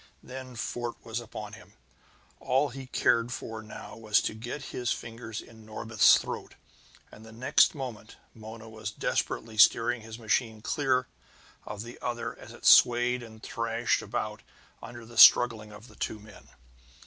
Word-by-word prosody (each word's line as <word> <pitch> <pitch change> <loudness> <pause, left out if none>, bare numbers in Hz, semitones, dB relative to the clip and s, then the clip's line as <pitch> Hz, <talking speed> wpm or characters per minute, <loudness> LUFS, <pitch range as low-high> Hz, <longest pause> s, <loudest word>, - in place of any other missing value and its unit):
And - - -14
then 130 -1 -8
Fort 120 +1 -4
was 115 +1 -3
upon 110 -2 -8
him. 110 -2 -14 0.7
All 135 +3 +1
he 130 +1 -9
cared 120 -1 +2
for 110 -2 -6
now 110 - -10
was 110 -2 +2
to - - -2
get 120 +6 -6
his 120 -1 -1
fingers 115 -1 -6
in 110 -1 -16
Norbith's 110 0 +4
throat. - - -6 0.6
And 110 - -14 0.2
next 130 - +4
moment 120 -6 -7 0.2
Mona 110 0 -10
was 110 -1 -6
desperately 110 +1 -3
steering 120 +2 +5
his 110 0 -9
machine 110 -1 -1
clear 130 +1 0 0.6
of 105 0 -6
the 120 +1 -11
other 120 -1 -3
as - - -12
it - - -12
swayed 120 +1 +6
and 110 -1 -13
thrashed 115 0 -1
about - - -4 0.4
under 120 0 -10
the 115 -1 -5
struggling 110 -3 +7
of 105 +3 -13
the - - -17
two 110 - -3
men. 105 -1 -16
115 Hz, 160 wpm, -28 LUFS, 110-120 Hz, 0.7 s, struggling